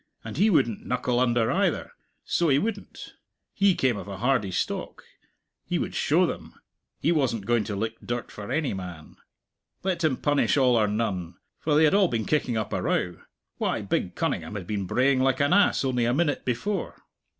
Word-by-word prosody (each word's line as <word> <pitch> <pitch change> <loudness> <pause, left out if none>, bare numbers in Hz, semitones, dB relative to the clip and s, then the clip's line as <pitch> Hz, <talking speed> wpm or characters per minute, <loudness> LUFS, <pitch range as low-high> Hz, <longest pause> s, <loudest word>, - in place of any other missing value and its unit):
And - - -7
he 205 +6 +4
wouldn't 130 - +2
knuckle 125 0 0
under, 120 -2 +2
either, - - 0 0.3
so 170 -2 +1
he 135 - +4
wouldn't. 205 +4 -4 0.4
He 195 -2 +3
came 125 -5 +1
of - - -7
a 100 -1 -6
hardy 120 -3 +1
stock. 95 0 -3 0.6
He - - -2
would - - -3
show - - +3
them! - - -6 0.4
He 165 - +2
wasn't 130 - 0
going 120 -2 +1
to 105 -1 -4
lick 110 +3 -3
dirt 120 0 -4
for 105 -1 -8
any 155 -7 0
man. 90 -5 -8 0.7
Let 180 -3 -1
him 145 -5 +2
punish 145 0 +2
all 130 -3 +4
or 110 -2 +3
none, 100 -5 -2 0.2
for 150 -2 +1
they 155 - +5
had 155 - +4
all 200 -2 +5
been 115 -7 -2
kicking 130 -6 0
up 110 - -3
a - - -1
row 90 -1 -1 0.4
why, - - -1
big - - -2
Cunningham - - -2
had 95 -4 -5
been 100 -1 -3
braying 130 +5 +2
like 130 0 +2
an 145 +4 +3
ass 205 -7 +4
only 125 -3 +1
a 120 +2 +1
minute 150 -1 0
before. 160 - -2
125 Hz, 195 wpm, -26 LUFS, 105-150 Hz, 0.7 s, they